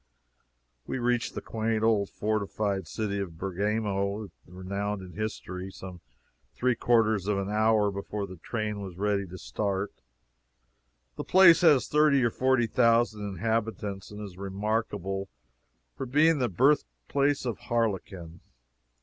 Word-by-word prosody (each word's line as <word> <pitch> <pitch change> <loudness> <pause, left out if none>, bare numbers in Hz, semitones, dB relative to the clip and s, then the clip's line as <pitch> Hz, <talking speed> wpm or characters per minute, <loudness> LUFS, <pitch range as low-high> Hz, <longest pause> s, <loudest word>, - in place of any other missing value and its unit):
We - - -2
reached 120 -1 0
the - - -5
quaint 110 0 -1
old 105 -3 +2
fortified 100 -3 -2
city 100 +1 -3
of 90 -5 -5
Bergamo, 100 +2 -2 0.2
the - - -18
renowned 100 +2 -4
in 90 -1 -11
history, 95 -3 -5
some 95 -2 -10 0.5
three 125 0 +2
quarters 110 -4 +2
of 105 -1 +1
an 100 +1 -2
hour 110 -1 +3
before 100 +1 -4
the 95 -1 -10
train 105 +3 -3
was 95 -3 -8
ready 100 -1 0
to 90 +1 -9
start. 100 0 -2 1.2
The - - -3
place 185 -2 +7
has 150 -7 +5
thirty 150 -3 +4
or 120 - +2
forty 130 -1 +2
thousand 115 -2 +2
inhabitants 105 0 -2
and 105 - -9
is 95 -3 -10
remarkable 100 -1 -2 0.7
for 135 - -5
being 150 +4 +4
the 125 -2 +1
birthplace 135 - +1
of 120 -4 -3
harlequin. 95 -7 -2
105 Hz, 135 wpm, -28 LUFS, 95-115 Hz, 1.2 s, place